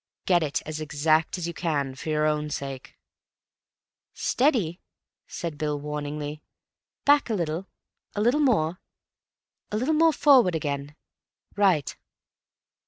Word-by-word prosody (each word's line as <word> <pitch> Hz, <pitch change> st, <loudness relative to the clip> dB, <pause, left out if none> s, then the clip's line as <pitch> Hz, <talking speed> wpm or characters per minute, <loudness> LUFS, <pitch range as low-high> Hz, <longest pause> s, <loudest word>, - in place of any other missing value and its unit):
Get 175 Hz, -2 st, +4 dB
it 150 Hz, -3 st, -1 dB
as 155 Hz, 0 st, -5 dB
exact 155 Hz, +3 st, +1 dB
as 175 Hz, -, -3 dB
you 170 Hz, -, -4 dB
can—for 145 Hz, -4 st, -2 dB
your 155 Hz, 0 st, +1 dB
own 150 Hz, 0 st, 0 dB
sake." 135 Hz, -2 st, -6 dB, 1.2 s
"Steady!" 225 Hz, -, +1 dB, 0.5 s
said 165 Hz, -4 st, -5 dB
Bill 150 Hz, -1 st, -1 dB
warningly. 150 Hz, 0 st, -5 dB, 0.6 s
"Back 285 Hz, -2 st, +4 dB
a 220 Hz, -, +1 dB
little.... 170 Hz, +1 st, -2 dB, 0.5 s
a 205 Hz, -, 0 dB
little 245 Hz, +7 st, +3 dB
more.... 185 Hz, -, +2 dB, 0.9 s
a 210 Hz, -, 0 dB
little 260 Hz, +8 st, +1 dB
more 325 Hz, +1 st, +5 dB
forward 260 Hz, -, +5 dB
again.... 145 Hz, -1 st, -3 dB, 0.6 s
Right." 185 Hz, -9 st, +2 dB
160 Hz, 120 wpm, -26 LUFS, 150-205 Hz, 1.2 s, more